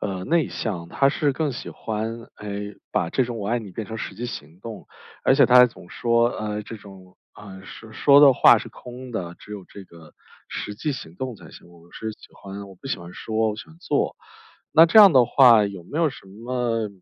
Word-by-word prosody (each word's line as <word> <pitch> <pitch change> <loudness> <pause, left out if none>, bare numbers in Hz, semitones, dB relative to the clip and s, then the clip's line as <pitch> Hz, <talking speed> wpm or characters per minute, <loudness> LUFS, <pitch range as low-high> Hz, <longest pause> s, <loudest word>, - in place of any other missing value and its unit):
呃， 95 -3 -4
内 165 - +1
向， 90 -7 -5
他 135 +9 +2
是 145 0 0
更 150 -1 -1
喜 125 - -8
欢， 115 +2 -5
哎， 105 0 -6 0.2
把 85 - -1
这 130 - +1
种 120 -1 -6
我 100 - -5
爱 120 +2 +1
你 105 -4 -9
变 105 +3 -6
成 110 +2 -7
实 100 - -6
际 115 +5 -6
行 85 -7 -8
动。 110 -1 -9 0.4
而 - - +5
且 - - +5
他 125 - +5
还 125 0 +9
总 105 -7 -14
说， 115 0 +1
呃， 105 -2 -4
这 110 +1 -9
种， 95 -2 -16 0.2
呃， 95 -2 -12
说 110 +3 -12
说 140 +4 +5
的 140 -2 +8
话 - - +6
是 - - -6
空 125 +1 -11
的， 90 -6 -5
只 105 - -12
有 100 -3 -9
这 100 - -12
个 85 -3 -17 0.3
实 105 - -6
际 145 +8 -3
行 85 -11 -9
动 130 -1 -5
才 - - -15
行。 - - -15
我 85 0 -20
是 110 - -5
喜 - - -17
欢 100 0 -10
我 95 - -14
不 95 - -13
喜 - - -3
欢 85 0 -11
说， 110 +3 -2
我 105 - -6
喜 - - -9
欢 160 - -17
做。 175 -5 -1 0.6
那 165 +1 +7
这 170 - +5
样 200 -4 +9
的 130 -4 +5
话 120 -4 +6
有 100 -3 -8
没 145 - -6
有 165 -2 +3
什 135 - -12
么 115 +1 -3
110 Hz, 250 characters per minute, -23 LUFS, 100-125 Hz, 0.6 s, 还